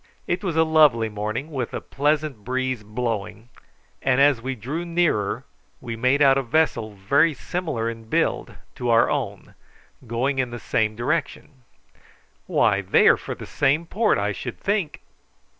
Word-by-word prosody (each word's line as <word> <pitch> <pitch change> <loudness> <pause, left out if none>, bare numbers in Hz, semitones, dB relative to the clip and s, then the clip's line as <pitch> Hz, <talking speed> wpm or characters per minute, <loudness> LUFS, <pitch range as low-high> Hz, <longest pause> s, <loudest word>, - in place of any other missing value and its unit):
It 175 +2 -2
was 180 -5 -2
a 160 - +5
lovely 150 -8 +4
morning, 110 +8 -4
with 130 -5 -3
a - - -2
pleasant 145 -4 -1
breeze 130 0 -2
blowing, 110 0 -4 0.5
and 130 -1 +2
as 140 -4 +4
we 130 +2 -3
drew 135 +10 -4
nearer 170 -12 0 0.3
we 115 -2 -6
made 130 +5 +2
out 135 0 +5
a - - 0
vessel 115 -6 0
very 140 +11 +2
similar 155 -7 -3
in 115 -1 -6
build - - 0 0.2
to 125 - -2
our 115 0 +4
own - - -4 0.5
going 130 +4 -1
in 125 -1 0
the 120 - -6
same 110 -1 0
direction. 130 +3 -3 0.9
"Why, - - +2
they - - +4
are - - +6
for - - -6
the - - -9
same 145 +4 +1
port, 215 +5 +1
I 100 +1 0
should 120 +4 -6
think!" 200 -6 -1
130 Hz, 160 wpm, -23 LUFS, 115-150 Hz, 0.9 s, are